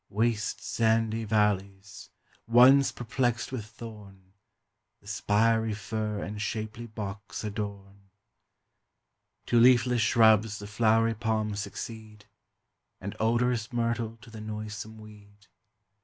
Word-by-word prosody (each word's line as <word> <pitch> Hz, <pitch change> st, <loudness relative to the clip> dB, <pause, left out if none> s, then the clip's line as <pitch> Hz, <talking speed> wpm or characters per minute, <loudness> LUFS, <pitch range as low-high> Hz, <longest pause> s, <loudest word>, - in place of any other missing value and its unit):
Waste 110 Hz, +1 st, -1 dB
sandy 115 Hz, 0 st, +1 dB
valleys, 100 Hz, -2 st, -1 dB, 0.4 s
once 130 Hz, +4 st, +6 dB
perplexed 120 Hz, 0 st, -2 dB
with 130 Hz, -5 st, -4 dB
thorn, 100 Hz, -4 st, -12 dB, 0.7 s
The -, -, -27 dB
spiry 105 Hz, +2 st, +1 dB
fir 105 Hz, 0 st, -3 dB
and 105 Hz, +2 st, -5 dB
shapely 110 Hz, +2 st, -4 dB
box 105 Hz, -2 st, -7 dB
adorn: 100 Hz, -2 st, -6 dB, 1.4 s
To 120 Hz, -, +3 dB
leafless 125 Hz, 0 st, +5 dB
shrubs 110 Hz, -2 st, +4 dB
the 105 Hz, -, -8 dB
flowery 115 Hz, +2 st, +2 dB
palms 110 Hz, -2 st, -1 dB
succeed, 110 Hz, 0 st, -7 dB, 0.7 s
And 100 Hz, +1 st, -6 dB
odorous 120 Hz, 0 st, +1 dB
myrtle 115 Hz, -1 st, -1 dB
to 115 Hz, -, -14 dB
the 110 Hz, -1 st, -9 dB
noisome 110 Hz, 0 st, -6 dB
weed. 105 Hz, -1 st, -15 dB
110 Hz, 105 wpm, -28 LUFS, 105-115 Hz, 1.4 s, once